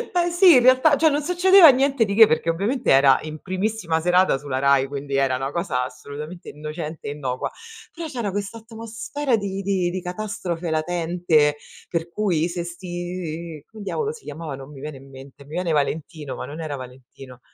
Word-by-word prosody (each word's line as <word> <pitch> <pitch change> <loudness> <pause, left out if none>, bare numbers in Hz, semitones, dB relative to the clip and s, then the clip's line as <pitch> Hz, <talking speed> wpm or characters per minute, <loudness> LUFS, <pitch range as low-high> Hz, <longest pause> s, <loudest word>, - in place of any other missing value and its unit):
Ma 350 0 +2
sì, 350 +1 +6
in 255 - +7
realtà, 260 +4 +5
cioè 315 +3 +4
non 290 0 -1
succedeva 360 +1 +7
niente 270 -2 +2
di 200 - -3
che, 220 +1 +8
perché 160 0 +1
ovviamente 220 +10 0
era 135 0 +6
in 155 0 -7
primissima 185 -3 -2
serata 180 -1 +3
sulla 135 -2 -4
RAI, 140 -1 +3
quindi 140 0 -5
era 135 -2 +2
una 135 +1 -3
cosa 145 -7 -1
assolutamente 150 +7 -9
innocente 155 +1 -7
e - - -2
innocua. 130 -4 -3 0.4
Però 335 -1 -6
c'era 240 -8 -3
questa 205 +3 -4
atmosfera 230 +4 -3
di 195 -1 -4
di 190 -2 0
di 185 +1 -4
catastrofe 180 -3 -4
latente, 160 -2 +1 0.3
per 170 0 -3
cui 175 -5 0
se 175 0 -4
'sti 175 -3 -6
come 220 -1 -13
diavolo 435 - -2
si 465 - -14
chiamava? 160 -3 -6
Non 135 +1 -11
mi 135 -2 -11
viene 150 -1 -7
in 135 +1 -15
mente. 135 +1 -13
Mi - - -18
viene 175 +1 -2
Valentino, 150 0 -2
ma - - -6
non 155 +3 -8
era 155 -3 -4
Valentino. 130 0 -12
175 Hz, 190 wpm, -23 LUFS, 145-215 Hz, 0.4 s, che